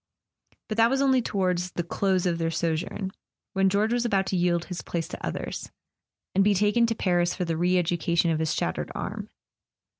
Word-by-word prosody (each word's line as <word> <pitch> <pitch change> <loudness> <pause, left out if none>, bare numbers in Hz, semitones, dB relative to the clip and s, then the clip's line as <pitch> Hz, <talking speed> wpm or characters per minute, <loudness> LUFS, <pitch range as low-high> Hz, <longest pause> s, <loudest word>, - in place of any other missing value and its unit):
But 215 - -4
that 230 0 +5
was 270 +1 +1
only 265 -2 +4
toward 185 -5 0
the 180 -1 -3
close 185 +1 0
of 170 -2 0
their 165 0 0
sojourn, 165 +4 -2 0.4
when 195 0 +3
George 210 +4 +1
was 240 -1 +1
about 195 -5 +1
to 190 - -2
yield 175 -1 +1
his 180 -2 -5
place 170 -2 -3
to - - -8
others, - - -4 0.6
and 195 - +4
be 205 0 +3
taken 210 +4 +3
to 230 - -1
Paris 175 -3 +1
for 180 - -2
the 165 -1 -1
re 180 +3 +2
education 170 -1 +1
of 155 - 0
his 160 -1 0
shat¬ 80 - -1
tered - - -4
arm. - - -5
180 Hz, 205 wpm, -26 LUFS, 170-205 Hz, 0.6 s, that